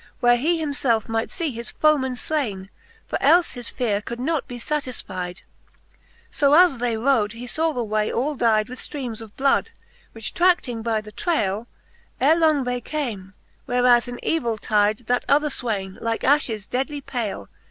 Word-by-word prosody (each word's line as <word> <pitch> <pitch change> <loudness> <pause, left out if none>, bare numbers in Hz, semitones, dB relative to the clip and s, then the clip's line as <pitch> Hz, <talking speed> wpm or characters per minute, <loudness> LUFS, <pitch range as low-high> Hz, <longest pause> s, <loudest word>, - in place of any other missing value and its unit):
Where 240 0 +5
he 330 +7 +1
himfelfe 270 -7 0
might 225 0 -1
fee 335 -5 -2
his 235 0 -6
foeman 280 -4 +2
flaine; 220 -10 -3 0.3
For - - -3
elfe 350 0 +4
his 245 -2 -6
feare 210 -5 -1
could 235 +3 -6
not 295 +2 -1
be 245 - -7
fatisfyde. 230 -10 -4 0.9
So 285 -1 +4
as 345 -7 +5
they 235 -2 0
rode, 225 -3 +2
he 235 +2 -8
faw 320 +6 0
the 245 -5 -2
way 215 -1 0
all 275 +6 0
dyde 220 -4 +2
With 255 +1 -9
ftreames 250 -7 -6
of 220 -2 -12
bloifd; 275 0 +2 0.4
which 225 -1 -5
trading 345 -10 +2
by 220 -1 0
the 215 0 -12
traile, 215 - -1 0.5
Ere 295 +5 +5
long 310 -4 +3
they 245 0 -2
came 215 -10 -4 0.3
whereas 245 -1 +4
in 245 0 -6
evill 240 -9 0
tyde 210 +2 +1
That 245 +2 +1
other 295 +1 +4
fwayne, 200 -8 -3
like 230 0 -2
afhes 250 -7 +1
dead 265 +4 -1
and 290 -2 -7
pale. 225 - -4
245 Hz, 175 wpm, -23 LUFS, 220-285 Hz, 0.9 s, Where